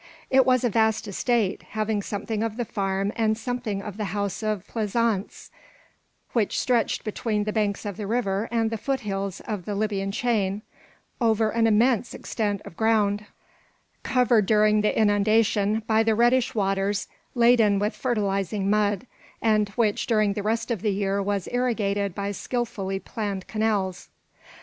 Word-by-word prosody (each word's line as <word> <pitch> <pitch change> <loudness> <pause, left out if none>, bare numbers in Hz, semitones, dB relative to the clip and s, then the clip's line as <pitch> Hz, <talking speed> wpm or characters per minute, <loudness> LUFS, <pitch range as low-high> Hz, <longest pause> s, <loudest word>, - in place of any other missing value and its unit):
It 265 0 +5
was 255 -1 +3
a 245 - +3
vast 220 +1 +2
estate, 210 0 0
having 215 -1 -2
something 210 +2 -3
of 225 -1 -2
the 240 - -1
farm 195 0 -1
and 220 -1 +1
something 230 -4 -3
of 205 -1 -7
the 215 - -2
house 200 +2 -3
of 215 -3 -2
pleasaunce, 220 -2 -1 0.8
which 225 -4 +1
stretched 240 -3 +1
between 215 0 -1
the 215 0 -3
banks 210 -1 -1
of 200 -3 -4
the 210 - -4
river 215 -2 -1
and 225 -1 +1
the 225 - -3
foothills 200 -7 -3
of 205 -5 -5
the 205 - -3
Libyan 200 -2 -1
chain, 210 -4 0 0.6
over 220 -1 +2
an 225 0 +2
immense 230 +2 +2
extent 205 -3 -2
of - - -10
ground, 210 -1 +1 0.7
covered 245 -5 +3
during 215 -1 +4
the 210 - +1
inundation 215 0 +2
by 220 0 +3
the 225 -1 +2
reddish 240 +2 +3
waters 195 0 0 0.3
laden 235 -4 +5
with 210 +3 -1
fertilising 200 -4 -1
mud, 210 +2 +1 0.3
and 215 -2 +2
which 220 -4 +1
during 215 -3 +2
the 205 - -3
rest 225 +3 -1
of 220 -6 -2
the 215 - +1
year 200 0 0
was 200 -1 -2
irrigated 205 -6 0
by 200 0 -2
skilfully 205 -3 -3
planned 200 -2 -4
canals. 210 -4 -1
215 Hz, 155 wpm, -25 LUFS, 200-225 Hz, 0.8 s, It